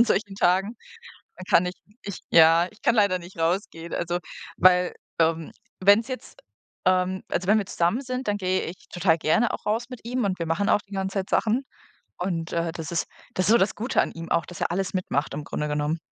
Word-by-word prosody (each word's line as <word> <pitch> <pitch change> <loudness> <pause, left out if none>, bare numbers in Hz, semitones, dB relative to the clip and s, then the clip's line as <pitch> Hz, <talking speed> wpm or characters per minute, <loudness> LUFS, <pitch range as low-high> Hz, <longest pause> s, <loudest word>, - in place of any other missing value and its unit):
an 235 - +8
solchen 200 -3 0
Tagen. 195 +4 +2 0.6
Dann 185 - -9
kann 180 - +5
ich 180 - -3 0.3
ich 200 -3 -6
ja, 165 +1 +6
ich 210 - -23
kann 235 - +3
leider 200 -4 +3
nicht 175 +1 -13
rausgehen. 170 0 -2
Also, 175 +1 -1 0.4
weil, 180 -1 +4 0.3
ähm, 165 0 +1 0.3
wenn's 205 +5 +5
jetzt 255 - -7 0.5
ähm, 185 0 +2
also 180 - -2
wenn 215 +1 +5
wir 200 - -2
zusammen 175 +9 0
sind, 255 -3 -4
dann 205 - +1
gehe 185 0 0
ich 180 +2 -9
total 175 -2 +2
gerne 225 +10 +2
auch - - -6
raus 225 +3 0
mit 250 - -8
ihm 245 -1 -1
und 190 -2 -1
wir 170 - -2
machen 175 +5 0
auch 205 - +4
die 200 0 -12
ganze 190 0 -2
Zeit 190 - -3
Sachen 230 +5 +1 0.5
und, 170 -3 -3
äh, 170 -1 -1
das 165 -1 -6
ist 170 - 0 0.3
das 185 - 0
ist - - +3
so 235 - +6
das 190 - +2
Gute 235 +5 +1
an - - -3
ihm 165 0 -8
auch, 170 - +1
dass 180 - -10
er - - 0
alles 195 +1 -2
mitmacht 155 -6 -1
im 150 - -5
Grunde 150 - -3
genommen. 150 +2 -1
185 Hz, 225 wpm, -25 LUFS, 170-205 Hz, 0.6 s, an